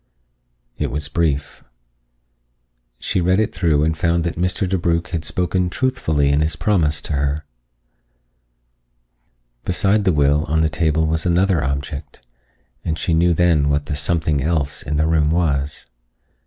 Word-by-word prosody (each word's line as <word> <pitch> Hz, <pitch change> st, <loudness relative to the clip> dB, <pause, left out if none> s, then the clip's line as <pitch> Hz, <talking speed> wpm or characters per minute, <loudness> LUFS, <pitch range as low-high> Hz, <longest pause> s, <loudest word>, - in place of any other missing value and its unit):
It -, -, -1 dB
was 75 Hz, +1 st, -3 dB
brief. 75 Hz, -3 st, -1 dB, 1.3 s
She 95 Hz, -, -1 dB
read 90 Hz, +3 st, +2 dB
it 110 Hz, -, 0 dB
through 80 Hz, -4 st, +2 dB
and 80 Hz, +1 st, +1 dB
found 85 Hz, +1 st, +1 dB
that 85 Hz, -1 st, -2 dB
Mr. 90 Hz, +2 st, -1 dB
DeBrugh 85 Hz, -2 st, 0 dB
had 85 Hz, -3 st, -3 dB
spoken 90 Hz, +2 st, -1 dB
truthfully 80 Hz, -, 0 dB
in 70 Hz, +1 st, +2 dB
his 80 Hz, +2 st, 0 dB
promise 85 Hz, -7 st, +1 dB
to -, -, -5 dB
her. 70 Hz, +1 st, -1 dB, 2.2 s
Beside 100 Hz, +3 st, +1 dB
the 95 Hz, -, +3 dB
will 75 Hz, -1 st, +2 dB
on 80 Hz, +1 st, +1 dB
the 80 Hz, -, +2 dB
table 80 Hz, +1 st, +1 dB
was 80 Hz, +2 st, 0 dB
another 90 Hz, -2 st, +2 dB
object, 70 Hz, -1 st, -5 dB, 0.6 s
and 80 Hz, -1 st, -2 dB
she 85 Hz, -, -1 dB
knew 85 Hz, +1 st, +3 dB
then 80 Hz, -4 st, +3 dB
what 70 Hz, 0 st, 0 dB
the 75 Hz, -2 st, -3 dB
"something 75 Hz, -1 st, 0 dB
else" 75 Hz, -1 st, -1 dB
in 75 Hz, +3 st, -3 dB
the 75 Hz, +1 st, +2 dB
room 80 Hz, -2 st, +2 dB
was. 75 Hz, -4 st, -1 dB
80 Hz, 150 wpm, -20 LUFS, 75-85 Hz, 2.2 s, the